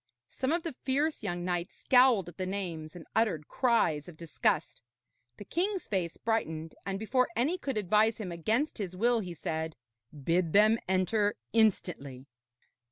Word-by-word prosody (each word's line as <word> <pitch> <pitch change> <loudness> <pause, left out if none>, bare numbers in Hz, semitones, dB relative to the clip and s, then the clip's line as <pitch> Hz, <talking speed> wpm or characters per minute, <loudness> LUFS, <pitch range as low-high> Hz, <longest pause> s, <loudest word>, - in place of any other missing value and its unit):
Some 260 +2 -1
of 335 0 0
the 330 - -4
fierce 290 +4 0
young 175 -4 -3
knights 175 -1 -2
scowled 250 -7 +5
at 175 - -11
the 185 -1 -2
names 175 -5 -4
and 175 - -10
uttered 195 -10 +1
cries 200 - +1
of 165 - -13
disgust. 165 -1 -1 0.6
The 205 - -9
king's 375 - -1
face 180 -5 -2
brightened, 165 -9 -2
and 195 0 -1
before 250 +5 +1
any 290 +11 +1
could 270 -7 -3
advise 215 +3 +3
him 200 -5 -5
against 220 - -1
his 185 -3 -4
will, 235 +4 +2
he 180 -5 -5
said: 160 -1 -3 0.4
'Bid 165 +3 0
them 215 +3 +6
enter 205 +3 +2 0.2
instantly.' 175 - +1
200 Hz, 160 wpm, -30 LUFS, 170-230 Hz, 0.6 s, them